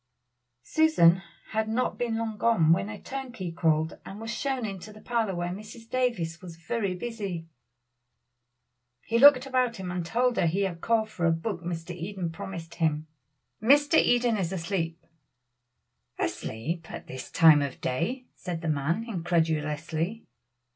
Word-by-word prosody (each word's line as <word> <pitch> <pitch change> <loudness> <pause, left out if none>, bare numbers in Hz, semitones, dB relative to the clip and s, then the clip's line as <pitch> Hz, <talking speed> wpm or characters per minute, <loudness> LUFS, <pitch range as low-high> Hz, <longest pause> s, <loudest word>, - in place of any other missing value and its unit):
Susan 190 - +4 0.3
had 220 0 -1
not 245 +3 0
been 235 -2 0
long 225 -1 -2
gone 195 -8 +4
when 195 +4 -1
a 210 - -7
turnkey 250 -10 -5
called, 160 -1 +1
and 195 - -9
was 225 +1 -5
shown 265 -3 -1
into 200 0 -6
the 215 - -13
parlor 225 -5 -1
where 175 0 -2
Mrs. 215 +4 -9
Davies 230 -10 -1
was 175 -2 -9
very 185 +4 -2
busy. 195 -5 -4 1.6
He 230 +1 +1
looked 270 -1 +8
about 255 -3 +1
him 185 -3 -5
and 180 -1 -2
told 245 +7 +1
her - - +3
he 180 +5 0
had 180 -4 -2
called 220 -2 +1
for 170 -5 0
a - - +4
book 170 +2 -2
Mr. 170 0 -4
Eden 180 0 -4
promised 165 0 -7
him. 155 -2 0 0.6
"Mr. 290 +7 +5
Eden 240 -2 +3
is 185 -3 -1
asleep." 170 -2 -3 1.1
"Asleep 160 +10 -3
at - - -7
this 130 0 -8
time 160 -3 +7
of 140 -2 -3
day?" 230 - -2
said 175 -3 -5
the 165 - -2
man 155 +8 0
incredulously. 165 0 -1
185 Hz, 155 wpm, -28 LUFS, 165-230 Hz, 1.6 s, looked